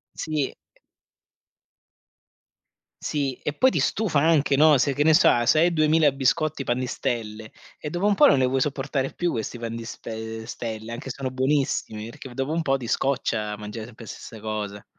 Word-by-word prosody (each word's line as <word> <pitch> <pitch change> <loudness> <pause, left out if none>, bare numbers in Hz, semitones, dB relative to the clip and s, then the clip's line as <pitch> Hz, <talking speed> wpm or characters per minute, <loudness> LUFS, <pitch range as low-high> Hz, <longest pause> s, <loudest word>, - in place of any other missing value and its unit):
Sì. 155 -4 -2 2.5
Sì, 140 -3 -1
e 150 - -1
poi 260 - +4
ti - - 0
stufa 195 -10 +1
anche 145 -2 +3
no, 150 0 +6
se 135 +2 +1
che 145 - +1
ne 160 +1 +5
so 170 - +6
a 120 -1 +4
se 155 - +4
hai 170 +2 +4
2.000 155 -1 +4
biscotti 145 +2 0
Pan 120 -1 0
di 130 - -2
Stelle 110 -2 -4 0.3
e 150 - -6
dopo 175 +6 -2
un 205 - +3
po' - - +6
non 140 - +5
ne 130 - +3
vuoi 130 +1 +1
sopportare 135 -1 -1
più 175 -1 -1
questi 115 +2 -4
Pan 115 0 -4
di 115 - -6
spe 110 -1 -7
Stelle, 110 -1 -6
anche 135 +3 -7
sono 135 0 -4
buonissimi, 130 -5 -1
perché 120 +2 -10
dopo 135 +4 -2
un 165 - 0
po' 135 -3 +1
ti 125 -3 -7
scoccia 110 -6 -1
mangiare 105 +1 -7
sempre 115 -1 -12
le - - -7
stesse 115 - -10
cose. 105 -2 -4
135 Hz, 190 wpm, -24 LUFS, 115-150 Hz, 2.5 s, no